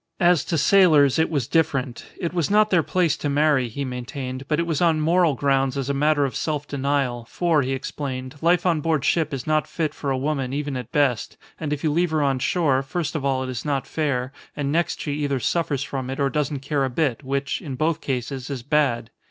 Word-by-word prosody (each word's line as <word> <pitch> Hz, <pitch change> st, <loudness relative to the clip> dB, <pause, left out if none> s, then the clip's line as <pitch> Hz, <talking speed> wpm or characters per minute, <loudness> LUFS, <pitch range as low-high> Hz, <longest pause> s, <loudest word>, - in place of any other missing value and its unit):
As 175 Hz, -4 st, +4 dB
to 165 Hz, -, -1 dB
sailors, 155 Hz, -6 st, +5 dB
it 160 Hz, -, +2 dB
was 140 Hz, -7 st, -1 dB
different; 140 Hz, -7 st, 0 dB
it 170 Hz, -3 st, -2 dB
was 170 Hz, -4 st, 0 dB
not 215 Hz, +1 st, +4 dB
their 180 Hz, -3 st, +5 dB
place 170 Hz, -1 st, +1 dB
to 145 Hz, -, -2 dB
marry, 145 Hz, -3 st, +3 dB
he 140 Hz, +5 st, -4 dB
maintained, 130 Hz, +1 st, -5 dB
but 150 Hz, 0 st, 0 dB
it 170 Hz, -, +1 dB
was 165 Hz, -2 st, -1 dB
on 165 Hz, -3 st, +3 dB
moral 165 Hz, -1 st, +3 dB
grounds 135 Hz, 0 st, +1 dB
as 135 Hz, 0 st, -1 dB
a -, -, -1 dB
matter 145 Hz, +1 st, +2 dB
of 135 Hz, -, -4 dB
self 150 Hz, -2 st, -2 dB
denial, 135 Hz, -3 st, -1 dB
for, 170 Hz, -4 st, +2 dB
he 135 Hz, 0 st, -1 dB
explained, 130 Hz, -1 st, -5 dB
life 175 Hz, +2 st, +3 dB
on 165 Hz, -4 st, +2 dB
board 155 Hz, -2 st, 0 dB
ship 160 Hz, -2 st, +1 dB
is 135 Hz, -3 st, -4 dB
not 155 Hz, -1 st, +1 dB
fit 155 Hz, -3 st, -2 dB
for 140 Hz, -, -4 dB
a 135 Hz, -, +1 dB
woman 135 Hz, -2 st, -2 dB
even 145 Hz, -1 st, -2 dB
at 125 Hz, -3 st, -6 dB
best, 135 Hz, -6 st, +1 dB, 0.2 s
and 155 Hz, -2 st, -3 dB
if 150 Hz, -1 st, -2 dB
you 155 Hz, -, +2 dB
leave 175 Hz, +3 st, +2 dB
her 155 Hz, -1 st, +1 dB
on 135 Hz, -2 st, +1 dB
shore, 145 Hz, -2 st, +2 dB
first 155 Hz, +3 st, -3 dB
of 150 Hz, -, -2 dB
all 135 Hz, -1 st, 0 dB
it 130 Hz, -, -5 dB
is 125 Hz, -2 st, -4 dB
not 140 Hz, -3 st, -1 dB
fair, 135 Hz, -5 st, -2 dB, 0.2 s
and 140 Hz, -1 st, -1 dB
next 170 Hz, +2 st, 0 dB
she 145 Hz, -, -3 dB
either 140 Hz, -2 st, 0 dB
suffers 145 Hz, +1 st, 0 dB
from 135 Hz, -2 st, -4 dB
it 135 Hz, -, -4 dB
or 140 Hz, -1 st, +1 dB
doesn't 150 Hz, 0 st, -1 dB
care 140 Hz, 0 st, 0 dB
a 135 Hz, -, 0 dB
bit, 135 Hz, -1 st, -1 dB
which, 140 Hz, +1 st, -2 dB
in 145 Hz, -7 st, -5 dB
both 155 Hz, +3 st, 0 dB
cases, 130 Hz, 0 st, -3 dB
is 135 Hz, -4 st, -4 dB
bad. 135 Hz, -5 st, +1 dB
145 Hz, 235 wpm, -23 LUFS, 135-155 Hz, 0.2 s, sailors